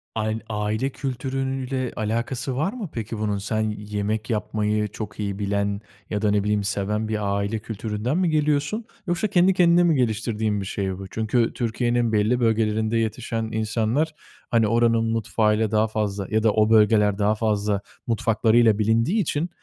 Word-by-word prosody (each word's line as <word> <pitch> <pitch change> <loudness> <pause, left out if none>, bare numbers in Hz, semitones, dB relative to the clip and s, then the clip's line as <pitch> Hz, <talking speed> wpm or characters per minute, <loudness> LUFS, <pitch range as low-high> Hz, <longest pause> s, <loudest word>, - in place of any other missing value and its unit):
Ayn 110 0 -1
aile 110 +5 -1
kültürüyle 130 -1 -3
alakası 120 +4 -2
var 160 - 0
mı 215 -10 -6
peki 115 -1 -4
bunun? 105 -2 0
Sen 110 +2 -2 0.2
yemek 105 +1 -3
yapmayı 105 -1 0
çok 105 0 -8
iyi 100 -1 -3
bilen 100 0 -1 0.3
ya 105 0 -2
da 105 -1 +2
ne 100 -1 +2
bileyim 105 -1 +1
seven 105 +2 -1
bir 105 -2 -1
aile 100 +2 -1
kültüründen 110 - -3
mi 180 -3 +2
geliyorsun? 150 +8 0 0.2
Yoksa 175 +5 0
kendi 190 -1 +4
kendine 175 -1 +5
mi 165 -3 +3
geliştirdiğin 110 -3 0
bir - - -5
şey 95 -1 -3
bu? 95 -1 -8
Çünkü 110 +3 0
Türkiye'nin 120 0 0
belli 110 +4 +2
bölgelerinde 110 -1 +1
yetişen 115 0 -2
insanlar, 110 +8 0 0.4
hani, 115 -2 +3
oranın 115 0 +3
mutfağıyla 110 -1 +1
daha 110 0 +3
fazla 105 -3 -2
ya 110 0 +1
da 110 - +4
o 110 0 +3
bölgeler 105 -2 +4
daha 105 +1 +2
fazla 105 -2 0 0.3
mutfaklarıyla 115 -1 +3
bilindiği 115 - +2
için 165 0 -1
110 Hz, 160 wpm, -24 LUFS, 105-120 Hz, 0.4 s, kendine